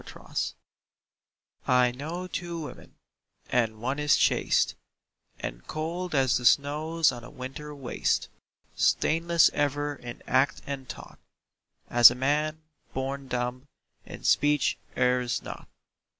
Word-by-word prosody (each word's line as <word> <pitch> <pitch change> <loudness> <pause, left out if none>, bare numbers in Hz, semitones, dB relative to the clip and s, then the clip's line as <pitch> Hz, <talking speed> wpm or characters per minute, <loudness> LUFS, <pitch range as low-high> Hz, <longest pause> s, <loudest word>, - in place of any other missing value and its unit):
TWO - - -11
WOMEN - - -16 1.3
I 125 -1 +4
know 160 +8 -5
two 175 -2 -5
women, 150 - -9 0.6
and 115 -3 +1
one 130 +5 -2
is 150 -1 +4
chaste - - +2 0.7
And - - -6
cold 170 +2 -3
as 130 -3 +3
the 125 - -6
snows 150 +5 +3
on 120 -2 -8
a 120 - -10
winter 145 +4 -8
waste, 135 -3 -1 0.5
Stainless 165 +1 +3
ever 145 0 -1
in 120 -3 -9
act 130 +2 +1
and 135 -2 -6
thought - - -10 0.7
(As 120 0 +9
a 120 - -4
man, 150 +4 0 0.3
born 135 +1 -3
dumb, 125 +2 -3 0.4
in - - -11
speech 145 0 +3 0.2
errs 125 -1 +1
not). - - -8
140 Hz, 125 wpm, -27 LUFS, 125-155 Hz, 1.3 s, As